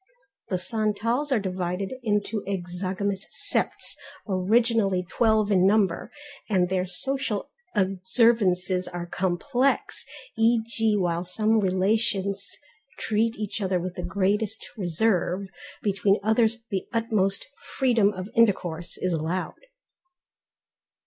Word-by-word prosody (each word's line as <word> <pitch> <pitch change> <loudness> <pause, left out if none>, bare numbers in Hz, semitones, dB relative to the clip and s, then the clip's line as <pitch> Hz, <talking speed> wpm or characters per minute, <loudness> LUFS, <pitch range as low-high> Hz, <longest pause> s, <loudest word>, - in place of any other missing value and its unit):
The 185 - 0
Santals 220 +8 -1
are 250 - +3
divided 185 +1 -3
into 210 -2 -1
exogamous 190 +1 -3
septs - - -1 0.3
originally 200 -1 +2
twelve 220 0 +2
in 185 -1 +5
number, 195 -4 +2 0.4
and 185 -4 +2
their 185 0 0
social 245 +3 -2 0.2
observances 185 -1 +2
are 175 -1 -5
complex, 215 +10 0 0.3
e.g. 225 -1 +2
while 175 -2 0
some 215 +5 +1
relations 200 +1 +1 0.5
treat 225 +1 0
each 210 0 -4
other 185 -2 +1
with 180 +1 -4
the 180 - -5
greatest 200 +4 -1
reserve, 185 0 0 0.4
between 200 0 +2
others 225 +1 +2
the 190 -2 -2
utmost 215 -4 0 0.3
freedom 235 -6 +3
of 185 -1 -6
intercourse 180 -7 +1
is 185 -1 -1
allowed. 170 - -3
200 Hz, 105 wpm, -26 LUFS, 185-220 Hz, 0.5 s, in